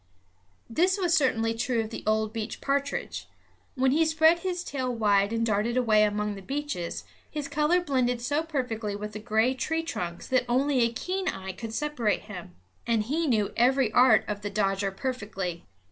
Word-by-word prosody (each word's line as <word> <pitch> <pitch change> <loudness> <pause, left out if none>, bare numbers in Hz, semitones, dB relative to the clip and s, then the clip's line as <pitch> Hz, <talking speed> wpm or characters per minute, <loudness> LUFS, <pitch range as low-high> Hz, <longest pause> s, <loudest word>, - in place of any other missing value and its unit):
This 360 - +2
was 355 -3 +1
certainly 225 -6 +2
true 230 +1 -1
of 220 0 -6
the - - -6
old 215 0 +1
beech 220 -1 -4
partridge. 280 +1 -2 0.5
When 260 0 +2
he 315 +4 +4
spread 320 +1 +4
his 355 0 -3
tail 260 -5 -2
wide 205 -3 +2
and 230 0 0
darted 220 +3 0
away 220 -4 +4
among 210 0 +1
the 195 - -8
beeches, 275 -7 -4 0.3
his 295 -2 -4
color 300 +5 +2
blended 255 -6 0
so 285 +6 0
perfectly 250 -10 -3
with 210 +1 -5
the 210 - -5
gray 220 +4 +2
tree 320 +5 -2
trunks 175 - -5
that 255 -1 +2
only 265 +2 +2
a 235 -1 +3
keen 370 +10 -3
eye 190 - -3
could 225 +4 -7
separate 290 -8 0
him. 180 - -9 0.3
And 230 -2 +2
he 305 +8 -1
knew 215 -6 +1
every 255 -1 +3
art 245 -2 +5
of 205 -1 -3
the 205 - -3
dodger 195 -1 0
perfectly. 195 - -4
235 Hz, 180 wpm, -27 LUFS, 210-285 Hz, 0.5 s, art